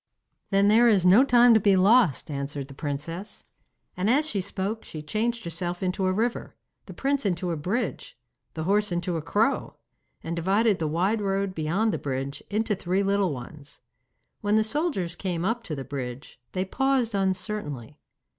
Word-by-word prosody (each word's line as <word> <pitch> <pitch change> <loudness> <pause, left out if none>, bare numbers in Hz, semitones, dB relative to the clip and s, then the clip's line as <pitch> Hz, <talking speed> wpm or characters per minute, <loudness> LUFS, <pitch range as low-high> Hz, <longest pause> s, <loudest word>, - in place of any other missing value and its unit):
'Then 200 0 +3
there 225 +3 +6
is 200 -6 +4
no 195 +8 +7
time 245 -3 +6
to 220 - +6
be 200 -1 +4
lost,' 190 - +4
answered 140 0 -4
the 135 - -11
princess; 150 +7 -5 0.5
and 185 +4 0
as 290 +6 +3
she 205 -10 0
spoke 200 +3 -4
she 155 - -8
changed 225 +9 -2
herself 175 +1 -4
into 185 +1 0
a - - +2
river, 225 +5 -2 0.3
the - - -8
prince 280 0 -1
into 180 -2 -1
a - - -1
bridge, 205 - -3 0.4
the 160 - -3
horse 205 +3 +1
into 175 0 -1
a 160 - -2
crow, 215 - 0 0.5
and 165 +1 -3
divided 195 +5 +2
the 160 - -1
wide 185 +8 0
road 195 -1 -1
beyond 180 +7 0
the - - -2
bridge 135 0 -4
into 220 +1 0
three 185 0 -1
little 200 -2 +1
ones. 140 +2 -9 0.6
When 205 0 +1
the 220 - +4
soldiers 220 - -1
came 175 -3 -3
up 230 +3 0
to 155 - -4
the 135 -2 -6
bridge, 130 -1 -7
they 185 0 -1
paused 260 +1 0
uncertainly. 185 - -2
190 Hz, 175 wpm, -26 LUFS, 165-220 Hz, 0.6 s, no